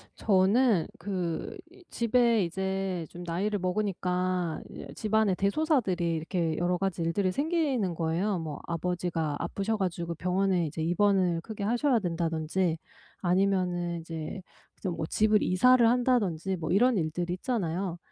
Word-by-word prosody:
저는 200 0 +3
그 180 -5 -3 0.2
이 365 +1 -18
집에 235 -2 +2
이제 190 0 -2
좀 175 - -9
나이를 195 +5 -1
먹으니까 180 -3 -1
이제 - - -9
집안에 215 -2 +1
대소사들이 200 - +1
이렇게 160 0 -1
여러 175 +1 +1
가지 190 -3 -2
일들이 185 +3 +1
생기는 280 - 0
거예요. 170 +5 0
뭐 155 -3 -5
아버지가 170 -3 -2
아프셔 200 +5 -2
가지고 170 -3 -2
병원에 185 +1 +1
이제 155 +1 -5
입원을 180 0 +2
크게 210 +2 -6
하셔야 240 +4 +2
된다든지 165 -1 -1 0.4
아니면은 180 -2 +1
이제 160 +3 -6 0.4
이제 190 - -3
뭐 165 -2 -3
집을 215 +5 +2
이사를 240 +6 +5
한다든지 225 -8 +1
뭐 160 -2 -3
이런 235 +3 +4
일들 170 +1 -2
있잖아요. 180 -3 -2
185 Hz, 320 characters per minute, -28 LUFS, 170-210 Hz, 0.4 s, 이사를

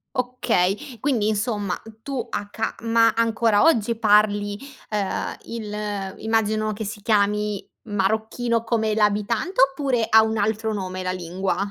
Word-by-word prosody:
Okay, 250 -1 0
quindi 240 -6 +1
insomma 210 -3 -1 0.2
tu 270 -1 -3
a 205 0 -4
ca 220 +2 -3
ma 230 0 +4
ancora 225 -2 +3
oggi 235 -7 +3
parli, 205 -1 +3 0.3
ehm, 205 -3 -2
il 210 -3 -4
immagino 215 -1 0
che 215 +1 -5
si 205 0 -6
chiami 210 -1 +1 0.2
marocchino 220 +3 0
come 220 -2 0
l'abitante, 215 - +1
oppure 270 -4 +2
ha 220 0 +7
un 220 0 -1
altro 220 +1 0
nome 185 -2 -4
la 185 - -1
lingua? 185 +1 -2
215 Hz, 135 wpm, -23 LUFS, 205-230 Hz, 0.3 s, ha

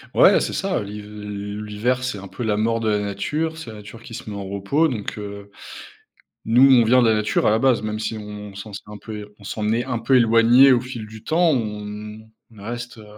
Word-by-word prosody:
Ouais, - - +6
c'est - - -2
ça. 195 -1 -1
Liv 105 +1 -8
l 105 0 -6
l'hiver, 120 +5 -1
c'est 125 -5 -3
un 100 - -9
peu 120 - -7
la 110 -2 +1
mort 115 +2 +1
de 115 - -2
la 105 -1 +2
nature, 150 +12 -2
c'est 125 -9 -8
la 110 - -10
nature 105 +3 -12
qui 115 - -11
se 110 - -7
met 105 - -6
en 100 -1 -5
repos, 100 +12 +1
donc 115 -9 -4
heu, 100 -1 -8 1.0
nous, 120 +3 +4
on 130 -3 +7
vient 125 +3 +5
de 115 - +4
la 110 - +4
nature 105 0 +1
à - - +5
la 110 - +3
base, 130 0 +3
même 110 0 -3
si 110 0 -3
on 105 -1 -8
s'en 100 +1 -9
s'est - - -7
un 105 0 -9
peu 110 +1 -8
é - - -9
on 100 - -16
s'en 105 +2 -2
est 120 +2 0
un 125 -3 -2
peu 115 +4 +3
éloigné 120 +3 +6
au 125 - +3
fil 125 -4 -7
du 110 0 -12
temps, 165 +1 +3
on 105 -2 -5 0.2
on 110 -3 -15
reste, 120 +2 -6
heu 110 - -12
110 Hz, 250 wpm, -22 LUFS, 105-120 Hz, 1.0 s, on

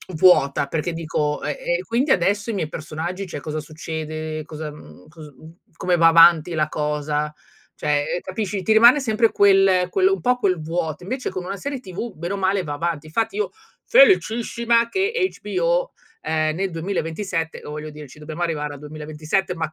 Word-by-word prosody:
vuota 155 -5 +4
perché 160 +4 -2
dico: 155 -2 -2
"E - - -1 0.3
e - - -4
quindi 255 +5 0
adesso 200 +3 +1
ai 225 - -2
miei 160 - -1
personaggi 165 +5 -5
cioè 160 - -6
cosa 155 +2 -4
succede? 155 0 -5
Cosa, 155 0 -6
mhmm, 90 - -15
cos 155 -2 -12
mhmm, 160 +5 -15 0.2
come 180 -1 +1
va 165 -1 +5
avanti 165 0 +6
la 155 -2 +1
cosa?" 150 0 -2 0.4
Cioè, 145 -1 0
ehm, - - -2
capisci, 195 0 -3
ti 220 +3 +2
rimane 235 +6 +7
sempre 230 -3 +2
quel 195 -2 +4
quello 385 0 +3
un - - -3
po' 250 0 +2
quel 190 -8 0
vuoto, 160 0 -3
invece 255 +5 -4
con 185 -1 -5
una 195 +2 -4
serie 280 +4 -4
TV 205 +1 -6
bene 170 +4 -5
o - - -2
male 195 0 +1
va 150 -3 -4
avanti. 160 0 -3
Infatti 225 - -1
io 425 - 0 0.4
felicissima 235 - +4
che 385 - 0 0.3
HBO, 180 -4 0 0.3
ehm, 155 0 0
nel 195 +1 -1
2027 165 0 -3
o - - -7
voglio 150 +1 -6
dire 150 -1 -10
ci 145 - -15
dobbiamo 155 +3 -5
arrivare 150 -3 -2
al - - -11
2027, 155 +5 -3
ma 160 -2 -2
170 Hz, 185 wpm, -22 LUFS, 155-200 Hz, 0.4 s, rimane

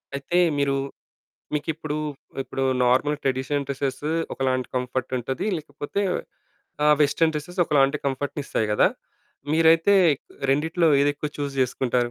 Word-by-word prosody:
అయితే 140 +6 -1 0.2
మీరు 140 -1 +1 0.8
మీకిప్పుడు 150 0 -3 0.5
ఇప్పుడు 135 - -4 0.2
నార్మల్ 130 +4 +2
ట్రెడిషనల్ 135 +2 -1
డ్రెసెస్ 140 0 -3 0.3
ఒకలాంటి 130 -1 -1
కంఫర్ట్ 125 0 -2
ఉంటది. 130 - -3
లేకపోతే 145 +4 -5 0.8
ఆహ్, 150 0 +6
వెస్టర్న్ 160 +2 +3
డ్రెసెస్ 160 +5 -6
ఒకలాంటి 140 -2 +3
కంఫర్ట్‌నిస్తాయి 140 -3 -2
కదా! 105 - +4 0.7
మీరైతే 165 +4 +5 0.6
రెండిట్లో 160 +4 +2
ఏదేక్కువ 145 +1 0
చూస్ 145 -1 -2
చేసుకుంటారు? 125 -1 0
145 Hz, 110 wpm, -24 LUFS, 130-150 Hz, 0.8 s, ఆహ్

